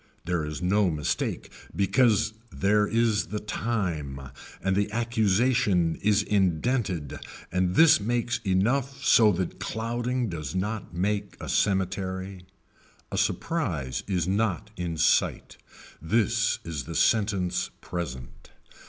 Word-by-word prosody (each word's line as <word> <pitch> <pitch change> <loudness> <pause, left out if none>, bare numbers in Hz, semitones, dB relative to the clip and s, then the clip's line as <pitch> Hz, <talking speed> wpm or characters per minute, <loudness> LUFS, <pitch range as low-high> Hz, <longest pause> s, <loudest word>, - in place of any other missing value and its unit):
There 90 -2 0
is 75 +3 -5
no 100 +1 +3
mistake 75 -3 -2 0.2
because 110 +1 +3 0.2
there 105 +2 +2
is 115 -1 +1
the 105 - -3
time 90 - -3 0.4
and 95 0 +1
the 105 +1 0
accusation 110 -5 +2
is 105 0 +2
indented 95 - 0 0.3
and 90 0 0
this 160 -2 +7
makes 120 +3 -1
enough 130 +8 0
so 110 -2 +6
that 90 0 -3
clouding 120 +2 -2
does 80 -4 -5
not 105 +3 -3
make 100 +2 -1
a - - -7
cemetery. 95 -1 -1 0.6
A - - -3
surprise 80 - -1
is 90 -4 0
not 105 +1 -1
in 85 -2 -4
sight. 80 - +1 0.4
This 110 +5 +1
is 80 -5 -5
the 85 - -7
sentence 100 -5 +1
present. 70 -9 -7
100 Hz, 120 wpm, -27 LUFS, 90-115 Hz, 0.6 s, this